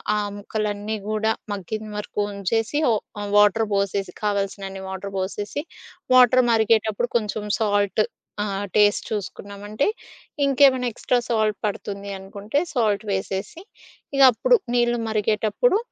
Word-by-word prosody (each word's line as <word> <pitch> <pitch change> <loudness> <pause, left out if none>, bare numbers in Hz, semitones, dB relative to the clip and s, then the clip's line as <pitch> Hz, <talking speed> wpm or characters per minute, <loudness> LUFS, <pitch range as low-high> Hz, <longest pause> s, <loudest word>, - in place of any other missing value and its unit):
ఆహ్, 205 -1 -1
ముక్కలన్నీ 210 +1 -3
గూడా 215 +1 +1 0.2
మగ్గిన 215 +2 -5
వరకు 210 0 -3
ఉంచేసి, 225 +7 -1
ఓ - - +4 0.3
ఆహ్, 205 0 -4
వాటర్ 210 +2 +5
పోసేసి, 200 0 -1
కావాల్సినన్ని 195 -1 -2
వాటర్ 195 +1 -6
పోసేసి 205 +9 -3 0.5
వాటర్ 255 0 +7
మరిగేటప్పుడు 220 +1 +2
కొంచెం 210 -1 -3
సాల్ట్ 205 -1 +2 0.4
ఆహ్, 200 0 -2
టేస్ట్ 205 -1 +4
చూసుకున్నామంటే 205 - -3 0.6
ఇంకేమైనా 265 -2 +4
ఎక్స్ట్రా 245 - +1
సాల్ట్ 215 -2 +1
పడుతుంది 200 0 -5
అనుకుంటే 200 +7 -3
సాల్ట్ 215 -5 +1
వేసేసి 195 - -3 0.6
ఇగప్పుడు 275 - +6 0.2
నీళ్లు 240 0 +2
మరిగేటప్పుడు 220 - +2
210 Hz, 115 wpm, -23 LUFS, 200-225 Hz, 0.6 s, వాటర్